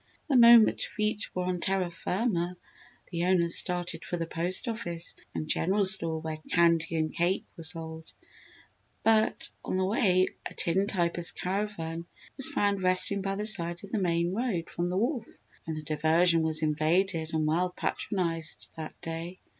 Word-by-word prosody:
The 280 - +2
moment 235 -2 +7
feet 210 0 -2
were 180 - -1
on 180 0 -2
terra 190 -1 -1
firma, 180 -1 -2 0.5
the 170 0 -1
owners 175 -2 +2
started 175 -2 -2
for 175 - -4
the 165 - -3
post 175 +6 0
office 175 -7 -3 0.2
and 155 - -3
general 195 +6 +1
store 165 -4 +4
where 160 -1 -5
candy 170 -1 +2
and 155 -1 -1
cake 175 +3 0
were - - -10
sold; 160 0 -5 0.9
but, 220 0 +1
on - - -2
the 190 - +1
way 185 -3 +2 0.2
a - - -14
tin 190 +4 +1
typer's 175 -3 0
caravan 180 -4 -4 0.3
was 270 - +6
found 200 -1 0
resting 185 +2 +4
by 195 0 -2
the 210 +1 -3
side 170 -5 +1
of 200 - -11
the 220 - -1
main 170 0 0
road 205 -7 -2
from 175 +1 -2
the 180 - -2
wharf, 235 +2 -1 0.4
and 160 -1 -4
the 155 - -6
diversion 160 +3 +3
was 160 0 -1
invaded 160 +2 0
and 155 -1 0
well 170 +4 +1
patronised 165 -3 -3
that 155 -1 -8
day. 165 +3 -6
175 Hz, 165 wpm, -28 LUFS, 165-195 Hz, 0.9 s, moment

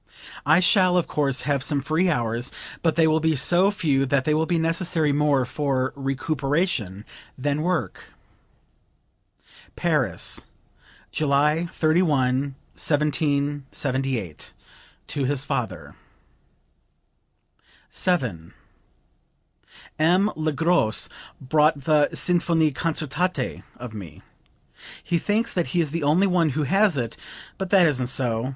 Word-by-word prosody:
I 160 +4 +5
shall, 180 0 +4
of 175 - +2
course, 140 -3 0
have 140 -1 0
some 145 +1 0
free 155 +6 +1
hours, 120 -4 -1 0.3
but 165 -2 +1
they 165 - +4
will 160 0 +3
be 160 0 +1
so 175 +8 +3
few 145 -9 0
that 135 0 +1
they 150 - +2
will 160 +1 +1
be 175 - +1
necessary 165 -1 +1
more 145 -2 +2
for 130 -1 -1
recuperation 135 - -2 0.3
than 145 +2 -1
work." 160 - -3 1.6
(Paris, - - 0 0.6
July 150 +3 +1
31, 140 -5 +1 0.2
1778, 140 - -1 0.5
to 140 -2 -2
his 140 +1 -1
father.) - - -4 2.0
7. 120 - -2 1.4
"M. 180 +6 +3
Le 155 0 -1
Gros 150 - +1 0.3
bought 150 +2 +2
the 150 0 +3
'Sinfonie 165 -3 +1
concertante' 155 +1 -2 0.2
of 120 -2 -8
me. 95 -8 -10 0.8
He 170 - 0
thinks 215 +6 0
that 175 -2 0
he 180 - -1
is 155 -4 0
the 165 +1 -2
only 155 +7 +3
one 180 -4 +2
who 155 - +1
has 195 +3 +2
it; 115 -3 -3 0.4
but 190 -1 -3
that 190 -3 +5
isn't 130 -6 +1
so. 125 -2 -1
150 Hz, 120 wpm, -24 LUFS, 135-170 Hz, 2.0 s, I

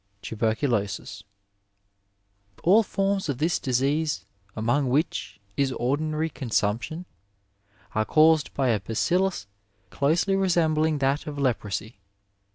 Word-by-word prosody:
Tuberoulosis. 110 -2 -1 0.7
— 100 0 -44
^AU 205 +6 +6
forms 195 -3 -1
of 140 - -1
this 160 +5 +1
disease, 140 +4 0 0.3
among 120 +5 +1
which 125 - -1 0.2
is 140 -1 +1
ordinary 155 +6 -1
consumption, 120 - -2 0.9
are 110 - +1
caused 155 +4 +4
by 135 -2 +1
a 110 -3 +2
bacUlus 170 - 0 0.5
closely 165 +7 +1
resembling 160 -5 +2
that 140 +2 0
of 145 -1 -5
leprosy. 110 -5 -2
140 Hz, 105 wpm, -26 LUFS, 110-160 Hz, 0.9 s, ^AU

